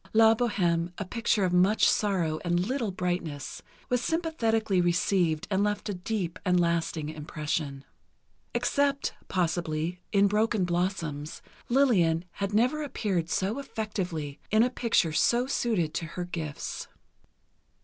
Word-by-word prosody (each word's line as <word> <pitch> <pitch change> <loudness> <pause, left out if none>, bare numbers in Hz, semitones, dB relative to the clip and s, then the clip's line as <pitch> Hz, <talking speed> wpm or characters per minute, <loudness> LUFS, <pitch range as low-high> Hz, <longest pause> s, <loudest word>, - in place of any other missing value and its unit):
"La 225 0 +7
Bohême," 180 -7 0
a 200 - -3
picture 225 0 0
of 180 -1 +1
much 190 +4 +4
sorrow 175 -7 +1
and 175 0 +1
little 245 -1 -1
brightness, 175 -6 -3 0.3
was 250 -1 +1
sympathetically 225 - +1
received 175 -2 +1
and 195 +1 +2
left 210 0 -1
a - - -1
deep 185 -2 -3
and 180 -2 +3
lasting 170 -2 0
impression. 150 -2 -4 0.7
Except, 280 -1 +1
possibly, 170 -1 -1
in 200 -1 +4
"Broken 210 -1 +2
Blossoms," 170 -4 -2 0.3
Lillian 185 -11 +3
had 200 +2 -3
never 250 +8 +2
appeared 200 - -1
so 195 +9 0
effectively—in 205 - -2
a 250 - +1
picture 225 -10 +1
so 240 +9 +3
suited 220 - 0
to 165 - -2
her 180 - -2
gifts. 160 -5 -5
185 Hz, 130 wpm, -28 LUFS, 170-220 Hz, 0.7 s, La